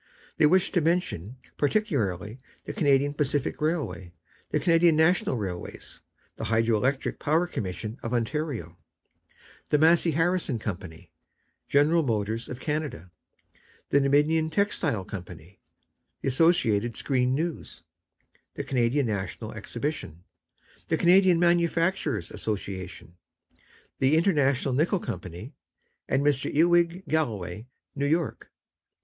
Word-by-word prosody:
They 155 - +5
wish 185 +4 +3
to 175 - +2
mention 150 - -1 0.2
particularly 120 - -1 0.3
the - - -5
Canadian 140 -1 +2
Pacific 145 -1 -1
Railway, 150 - -2 0.4
the - - 0
Canadian 165 -1 +4
National 160 -4 +2
Railways, 95 -5 -6 0.4
the - - -4
Hydro 115 0 +2
Electric 130 +5 -1
Power 160 +4 +2
Commission 110 - -5
of 115 - -5
Ontario, 120 - -3 0.9
the 150 - +3
Massey 165 +3 +4
Harris 175 +1 +1
Company, 90 -5 -7 0.6
General 150 +4 +3
Motors 110 -3 -2
of 125 - -6
Canada, 150 - -4 0.8
the 140 - +4
Dominion 150 +3 +2
Textile 160 - 0
Company, 90 -2 -10 0.6
the - - 0
Associated 120 - +2
Screen 130 -2 +1
News, 165 +2 -4 0.7
the - - -4
Canadian 130 +2 +1
National 110 +1 -4
Exhibition, 110 - -5 0.6
the 160 - +1
Canadian 180 +1 +5
Manufacturers' 170 -1 +1
Association, 95 -4 -5 0.8
the 135 +3 +3
International 140 -7 +2
Nickel 160 +9 +2
Company, 110 - -7 0.6
and 135 +1 +1
Mr. 145 -2 +1
Ewing 175 +3 +3
Galloway, 110 - -2 0.3
New 140 0 -1
York. 160 0 -1
140 Hz, 110 wpm, -26 LUFS, 110-165 Hz, 0.9 s, They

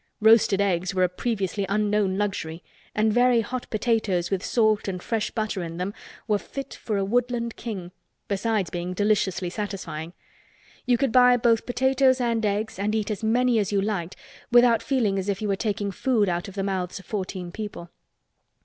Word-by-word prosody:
Roasted 220 -3 +5
eggs 190 -1 0
were 185 - +3
a - - +5
previously 195 0 -2
unknown 205 -2 +1
luxury 180 -5 -3 0.3
and 215 0 +2
very 245 0 +4
hot 245 +3 -5
potatoes 215 -6 0
with 190 -2 -1
salt 215 -3 +2
and 180 -2 -4
fresh 220 -2 -1
butter 215 -4 -2
in 165 -1 -6
them 185 +3 -3 0.3
were 210 -2 +2
fit 275 +5 -7
for 215 -3 -3
a 195 - 0
woodland 235 +1 0
king—besides 200 0 -4
being 175 +1 -4
deliciously 200 -3 +1
satisfying. 180 -4 -5 0.7
You 245 -1 +4
could 270 0 +1
buy 250 0 +6
both 230 -1 +2
potatoes 260 +1 +3
and 230 -2 0
eggs 210 -1 -1
and 210 +2 0
eat 215 0 -1
as 210 0 -4
many 240 +1 +3
as 205 -2 -1
you 200 - +2
liked 195 -3 -2 0.4
without 240 -1 +6
feeling 225 -8 +1
as 190 +2 -3
if 195 -1 -1
you 215 - -2
were 200 - +1
taking 205 -1 -2
food 220 0 +1
out 175 -1 -1
of 195 - -10
the 195 - -2
mouths 190 -2 -2
of 195 - -11
fourteen 185 -3 -4
people. 205 -4 -7
210 Hz, 180 wpm, -25 LUFS, 190-230 Hz, 0.7 s, buy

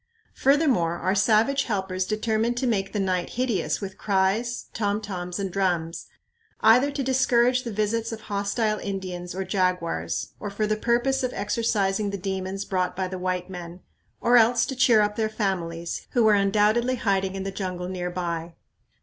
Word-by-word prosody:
Furthermore, 265 - +2
our 185 - 0
savage 225 +7 +3
helpers 190 -4 -2
determined 220 +2 0
to 260 - 0
make 195 -5 0
the 210 - -2
night 185 -2 0
hideous 245 -5 -1
with 190 -1 -7
cries, 205 +4 0
tom 205 -1 0
toms, 180 -4 -5
and 195 -2 -3
drums, 175 -4 -1 0.5
either 245 +6 +6
to 280 -1 -3
discourage 250 -1 +3
the 235 - -4
visits 215 +2 -1
of 225 -1 -6
hostile 210 +1 -1
Indians 185 -3 -5
or 190 - -2
jaguars, 175 - -1
or 205 - -4
for 205 +2 -1
the 215 0 +1
purpose 240 +5 +1
of 255 - -1
exorcising 205 -1 0
the 200 - -3
demons 190 +1 -3
brought 185 -2 -1
by 190 0 -1
the 185 0 -6
white 180 0 -2
men, 180 -1 -8 0.4
or 240 +1 +5
else 235 +1 +4
to 265 - -5
cheer 240 -4 +5
up 210 0 0
their 220 -1 +1
families, 170 -6 -3
who 240 - +3
were 215 -1 +6
undoubtedly 210 +5 +3
hiding 195 -4 0
in 195 - -3
the 195 - -3
jungle 185 -2 -4
near 180 -1 -3
by. 170 -2 -4
200 Hz, 175 wpm, -25 LUFS, 185-230 Hz, 0.5 s, either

